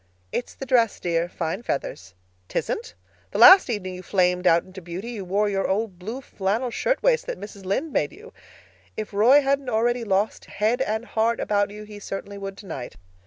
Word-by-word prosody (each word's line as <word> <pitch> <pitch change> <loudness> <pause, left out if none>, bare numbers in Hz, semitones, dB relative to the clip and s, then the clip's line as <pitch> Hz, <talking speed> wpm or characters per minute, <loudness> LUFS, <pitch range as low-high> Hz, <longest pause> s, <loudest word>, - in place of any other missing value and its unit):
"It's 245 - -4
the 270 - -6
dress, 240 -4 +2
dear. 170 0 0
Fine 175 +4 -3
feathers." 95 - -4 0.3
"'Tisn't. 465 - -3 0.3
The - - -4
last 375 -5 +9
evening 195 -5 -3
you 180 - -7
flamed 180 -1 +1
out 165 0 +5
into 190 0 -11
beauty 180 +7 -6
you 215 -5 -5
wore 200 +3 +1
your 195 -1 0
old 195 -2 -1
blue 225 +8 -5
flannel 220 +2 -2
shirtwaist - - +1
that - - -4
Mrs. 200 -2 -10
Lynde 270 +11 -1
made - - +1
you. - - -14 0.6
If 215 -1 -5
Roy 240 +8 +6
hadn't 275 -1 0
already 240 +1 +1
lost 205 0 0
head 225 +5 0
and 220 -2 -1
heart 230 0 0
about 205 -1 +1
you 210 +1 -9
he 210 -1 -10
certainly 200 0 -6
would 195 0 -6
tonight. 130 - -7
210 Hz, 185 wpm, -24 LUFS, 190-240 Hz, 0.6 s, last